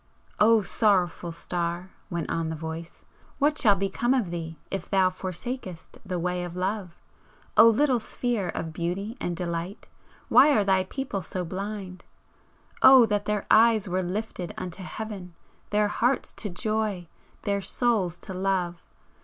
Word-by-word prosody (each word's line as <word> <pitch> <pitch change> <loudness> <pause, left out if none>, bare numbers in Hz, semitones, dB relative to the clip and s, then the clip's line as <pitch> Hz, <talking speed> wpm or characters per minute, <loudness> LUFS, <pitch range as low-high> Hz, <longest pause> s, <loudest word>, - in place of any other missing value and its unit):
"O 220 0 +5
Sorrowful 180 -5 +1
Star!" 175 +2 -3 0.2
went 170 -4 -3
on 165 -1 -1
the 160 - -3
Voice 160 +1 -7 0.3
"What 295 +1 +2
shall 205 -4 +5
become 195 +6 0
of 215 -10 0
thee 165 -2 -5
if 195 -3 -4
thou 190 -2 +3
forsakest 185 0 -6
the 185 -3 -3
way 180 +1 -1
of 175 -1 -6
Love! 185 -1 -3 0.6
O 230 - +9
little 255 +2 +3
Sphere 225 -4 -2
of 160 -1 -4
beauty 185 +7 -3
and 175 -1 -2
delight, 170 +2 -4 0.4
why 270 +5 +6
are 210 - +3
thy 190 -1 +2
people 250 -3 -4
so 180 +1 -4
blind! 190 0 -6 0.8
O 260 -3 +9
that 205 -2 -1
their 210 -1 -1
eyes 225 -2 +5
were 185 +1 0
lifted 185 -1 -4
unto 180 +1 -6
Heaven! 190 -2 -7 0.3
their 210 0 +2
hearts 245 +5 0
to 210 - -4
joy! 210 -1 -2 0.4
their 200 -1 0
souls 200 -6 +1
to 190 - -7
love! 185 -2 -1
190 Hz, 150 wpm, -26 LUFS, 175-215 Hz, 0.8 s, O